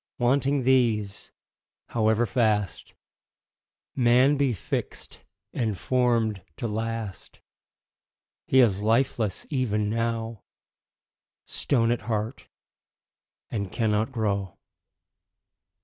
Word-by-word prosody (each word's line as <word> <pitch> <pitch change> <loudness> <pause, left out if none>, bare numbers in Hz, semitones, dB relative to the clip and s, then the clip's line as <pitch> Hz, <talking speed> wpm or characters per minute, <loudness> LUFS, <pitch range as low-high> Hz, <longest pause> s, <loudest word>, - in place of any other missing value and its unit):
Wanting 135 +2 +2
these, 115 -6 +1 0.6
however 110 0 +2
fast 105 -7 0 1.0
Man 125 +3 +4
be 140 -2 +2
fix'd 105 - -5 0.3
and 110 -6 -1
form'd 115 -5 +1 0.2
to 115 - -3
last, 110 -2 -5 1.1
He 130 - +5
is 100 -5 +3
lifeless 110 -2 +1
even 105 -6 0
now, 115 -1 -2 1.0
Stone 115 -4 +1
at 120 - 0
heart, 110 +3 -3 1.0
and 100 -4 -3
cannot 110 0 0
grow. 100 -6 -2
115 Hz, 85 wpm, -26 LUFS, 105-125 Hz, 1.1 s, He